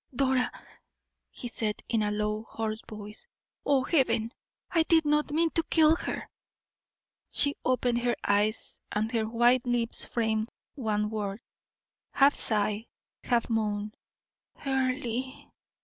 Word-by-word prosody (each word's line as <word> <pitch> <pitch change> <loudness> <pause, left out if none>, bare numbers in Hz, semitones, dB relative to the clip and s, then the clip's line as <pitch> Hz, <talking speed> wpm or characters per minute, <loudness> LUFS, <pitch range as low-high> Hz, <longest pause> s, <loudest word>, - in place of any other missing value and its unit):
"Dora!" 260 -1 +2 0.8
he 245 - -6
said, 220 -3 -3
in 230 -2 +1
a 210 - +1
low, 210 +1 -2
hoarse 220 -1 -3
voice. 210 - -9 0.4
"Oh, 275 -2 +3
Heaven! 250 -7 +1 0.4
I 330 - +4
did 320 -1 +4
not 300 0 +2
mean 325 +2 +2
to 330 - +3
kill 320 -1 +5
her."' - - -4 1.0
She 285 0 +5
opened 245 -1 +1
her 240 0 0
eyes, 205 +2 0
and 215 +2 -1
her 225 -2 0
white 240 +2 +4
lips 240 -1 0
framed 220 -1 -1 0.2
one 210 -5 -1
word, 205 -1 -3 0.7
half 280 +1 +5
sigh, 210 0 0 0.4
half 240 -2 +1
moan 210 -2 -1 0.7
"Earle!" 260 -1 -2
235 Hz, 125 wpm, -28 LUFS, 215-265 Hz, 1.0 s, kill